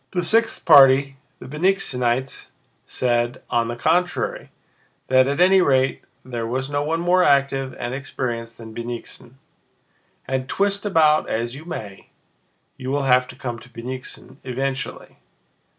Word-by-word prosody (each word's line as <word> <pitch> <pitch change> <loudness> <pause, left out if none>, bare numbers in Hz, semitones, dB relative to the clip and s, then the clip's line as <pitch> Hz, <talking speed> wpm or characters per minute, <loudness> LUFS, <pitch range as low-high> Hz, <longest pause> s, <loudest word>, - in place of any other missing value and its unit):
The 180 - 0
sixth 225 +6 +1
party, 135 -2 +6 0.2
the - - -12
Bennigsenites, 130 -6 -1 0.4
said, 120 -1 -1
on 115 -1 +1
the 120 - -4
contrary, 180 - -1 0.6
that 130 0 +4
at 140 +2 -1
any 185 +1 +5
rate 130 -4 +1 0.2
there 120 -3 -4
was 130 +4 -3
no 145 0 0
one 160 +2 -1
more 175 +2 +3
active 135 -2 +1
and 120 - -4
experienced 120 -4 -5
than 110 -1 -11
Bennigsen: 120 +1 -7 0.9
"and 130 -1 -2
twist 200 +1 0
about 155 -5 +3
as 115 +2 -2
you 150 +4 -10
may, 105 - -8 0.7
you 130 - -6
will 140 +1 0
have 125 -1 +3
to - - -11
come 120 -2 -5
to 120 - -16
Bennigsen 125 +3 -8
eventually. 130 0 -4
130 Hz, 140 wpm, -22 LUFS, 120-155 Hz, 0.9 s, party